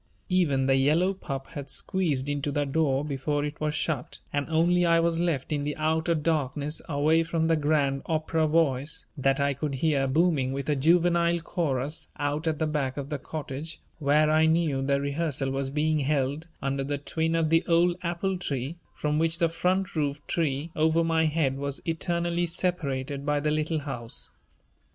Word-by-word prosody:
Even 155 Hz, -8 st, +2 dB
the 135 Hz, 0 st, +4 dB
yellow 160 Hz, +8 st, +3 dB
pup 135 Hz, -8 st, -5 dB
had 140 Hz, -2 st, -7 dB
squeezed 155 Hz, -9 st, -1 dB
into 145 Hz, 0 st, -1 dB
the 145 Hz, +1 st, 0 dB
door 140 Hz, -1 st, +1 dB
before 145 Hz, +1 st, -1 dB
it 150 Hz, +1 st, -6 dB
was 155 Hz, 0 st, 0 dB
shut 155 Hz, -5 st, -2 dB, 0.2 s
and 145 Hz, +2 st, -1 dB
only 175 Hz, +2 st, +3 dB
I 170 Hz, -1 st, +4 dB
was 165 Hz, 0 st, +1 dB
left 165 Hz, -6 st, -1 dB
in 145 Hz, -1 st, -1 dB
the 150 Hz, 0 st, -2 dB
outer 160 Hz, +2 st, +1 dB
darkness 150 Hz, -1 st, -1 dB
away 155 Hz, +2 st, +3 dB
from 165 Hz, 0 st, 0 dB
the 165 Hz, -, +3 dB
grand 145 Hz, -3 st, +1 dB
opera 160 Hz, 0 st, +1 dB
voice 150 Hz, 0 st, +1 dB
that 135 Hz, -1 st, +1 dB
I 140 Hz, 0 st, +2 dB
could 140 Hz, +1 st, -3 dB
hear 140 Hz, -1 st, +1 dB
booming 140 Hz, -3 st, +2 dB
with 140 Hz, +2 st, -4 dB
a 150 Hz, -, +3 dB
juvenile 170 Hz, +3 st, +3 dB
chorus 150 Hz, -4 st, -2 dB
out 145 Hz, +3 st, -1 dB
at 155 Hz, -1 st, +1 dB
the 160 Hz, -, 0 dB
back 145 Hz, -4 st, -1 dB
of 140 Hz, -1 st, -4 dB
the 145 Hz, -, -2 dB
cottage 150 Hz, +2 st, -6 dB, 0.2 s
where 150 Hz, +1 st, +3 dB
I 155 Hz, +1 st, +4 dB
knew 160 Hz, -4 st, +2 dB
the 140 Hz, +1 st, +1 dB
rehearsal 140 Hz, -1 st, -1 dB
was 135 Hz, 0 st, -2 dB
being 155 Hz, +2 st, +1 dB
held 145 Hz, +2 st, 0 dB, 0.2 s
under 135 Hz, 0 st, -1 dB
the 145 Hz, +1 st, -2 dB
twin 160 Hz, +3 st, -1 dB
of 160 Hz, -1 st, +1 dB
the 165 Hz, +1 st, +4 dB
old 170 Hz, 0 st, +4 dB
apple 180 Hz, +2 st, -2 dB
tree 140 Hz, -1 st, -3 dB, 0.2 s
from 150 Hz, 0 st, 0 dB
which 165 Hz, 0 st, +2 dB
the 170 Hz, -2 st, +2 dB
front 185 Hz, +3 st, 0 dB
roof 145 Hz, -2 st, 0 dB
tree 155 Hz, -1 st, -1 dB
over 160 Hz, +2 st, +3 dB
my 165 Hz, -1 st, +2 dB
head 150 Hz, -4 st, 0 dB
was 140 Hz, 0 st, -3 dB
eternally 170 Hz, +1 st, -1 dB
separated 145 Hz, -6 st, -2 dB
by 145 Hz, 0 st, +1 dB
the 150 Hz, +1 st, 0 dB
Little 155 Hz, +1 st, 0 dB
House. 120 Hz, -5 st, -6 dB
150 Hz, 185 wpm, -27 LUFS, 140-165 Hz, 0.2 s, the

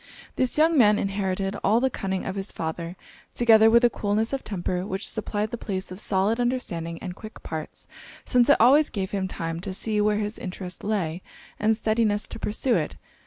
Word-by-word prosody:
This 255 Hz, +1 st, +1 dB
young 315 Hz, 0 st, +4 dB
man 210 Hz, -3 st, +6 dB
inherited 195 Hz, 0 st, -1 dB
all 215 Hz, +4 st, +4 dB
the 265 Hz, +1 st, +1 dB
cunning 190 Hz, -3 st, -3 dB
of 190 Hz, -, -3 dB
his 195 Hz, 0 st, -3 dB
father, 165 Hz, +2 st, -5 dB, 0.4 s
together 225 Hz, -2 st, +6 dB
with 235 Hz, +2 st, +5 dB
a -, -, +5 dB
coolness 215 Hz, +4 st, -1 dB
of 270 Hz, -, -2 dB
temper 180 Hz, -2 st, -3 dB
which 195 Hz, 0 st, -3 dB
supplied 210 Hz, -1 st, -2 dB
the 240 Hz, -, -5 dB
place 190 Hz, -2 st, -4 dB
of 185 Hz, -, -8 dB
solid 205 Hz, +3 st, +1 dB
understanding 190 Hz, -10 st, -2 dB
and 180 Hz, -2 st, -5 dB
quick 215 Hz, +2 st, -11 dB
parts; 155 Hz, -1 st, -6 dB, 0.4 s
since 250 Hz, +1 st, +3 dB
it 285 Hz, -, +7 dB
always 280 Hz, +6 st, +6 dB
gave 190 Hz, -3 st, -3 dB
him 195 Hz, -2 st, -1 dB
time 165 Hz, -2 st, -4 dB
to 185 Hz, +1 st, -5 dB
see 210 Hz, +1 st, 0 dB
where 210 Hz, 0 st, +2 dB
his 210 Hz, +1 st, -3 dB
interest 185 Hz, -3 st, -7 dB
lay, 185 Hz, -5 st, -1 dB, 0.4 s
and 215 Hz, +1 st, +2 dB
steadiness 215 Hz, -2 st, +1 dB
to -, -, -7 dB
pursue 240 Hz, +4 st, 0 dB
it. -, -, -1 dB
205 Hz, 195 wpm, -25 LUFS, 190-225 Hz, 0.4 s, it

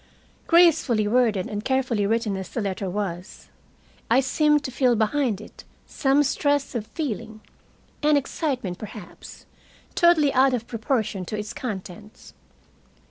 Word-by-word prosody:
Gracefully 320 Hz, -11 st, +4 dB
worded 220 Hz, -4 st, +2 dB
and 210 Hz, 0 st, -5 dB
carefully 260 Hz, -6 st, 0 dB
written 225 Hz, -2 st, 0 dB
as 190 Hz, -1 st, -6 dB
the -, -, -4 dB
letter 195 Hz, -2 st, -3 dB
was, 180 Hz, -2 st, -5 dB, 0.6 s
I 235 Hz, +3 st, +5 dB
seemed 295 Hz, +2 st, +2 dB
to 260 Hz, -, -4 dB
feel 250 Hz, -1 st, +2 dB
behind 220 Hz, 0 st, 0 dB
it 215 Hz, -, -13 dB, 0.2 s
some 275 Hz, +1 st, +2 dB
stress 285 Hz, 0 st, 0 dB
of 225 Hz, -3 st, -4 dB
feeling, 220 Hz, -5 st, -5 dB, 0.6 s
an 300 Hz, 0 st, +4 dB
excitement 260 Hz, -, -3 dB
perhaps, 210 Hz, -3 st, -11 dB, 0.5 s
totally 330 Hz, -5 st, +4 dB
out 260 Hz, 0 st, +4 dB
of 235 Hz, -2 st, -5 dB
proportion 220 Hz, -4 st, -2 dB
to 215 Hz, -, -4 dB
its 210 Hz, +1 st, -5 dB
contents. 210 Hz, -2 st, -8 dB
235 Hz, 135 wpm, -24 LUFS, 210-275 Hz, 0.6 s, I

